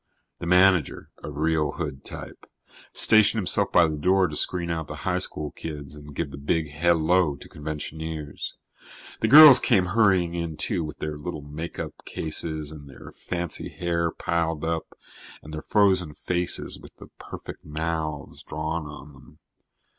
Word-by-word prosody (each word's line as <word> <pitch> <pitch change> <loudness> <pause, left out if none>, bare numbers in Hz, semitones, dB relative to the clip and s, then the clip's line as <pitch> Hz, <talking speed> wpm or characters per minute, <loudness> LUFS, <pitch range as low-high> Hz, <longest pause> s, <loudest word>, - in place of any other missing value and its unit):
The 85 - -5
manager, 90 -3 +3
a - - -6
real 75 0 0
hood 65 0 -5
type, - - -9 0.4
stationed 110 +1 +5
himself 100 -5 +3
by 85 - +5
the 75 -1 -4
door 95 +4 +3
to 75 - -7
screen 85 +2 +1
out 80 -2 -3
the - - -7
high - - +1
school 75 -2 -1
kids 75 -2 -8
and 75 -1 -12
give 75 -2 -3
the 70 - -9
big 75 +1 -1
hello 80 +1 +2
to - - -12
conventioneers. 75 0 -6 0.6
The 110 - +1
girls 145 0 +11
came 95 -2 +2
hurrying 95 -6 +3
in, 85 -2 -4
too, 90 -6 -1
with 75 -2 -7
their 75 -1 -5
little 75 -1 -6
makeup 75 +4 -7
cases 80 -1 -3
and 75 -3 -11
their 70 - -12
fancy 85 -2 -5
hair 85 -2 -1
piled 80 -1 -2
up 80 0 -4 0.5
and 75 - -11
their 75 - -5
frozen 95 -7 +2
faces 90 -1 -2
with - - -15
the - - -14
perfect - - -10
mouths 80 -1 -4
drawn 80 +1 -4
on 75 0 -11
them. 65 - -18
80 Hz, 160 wpm, -25 LUFS, 75-85 Hz, 0.6 s, girls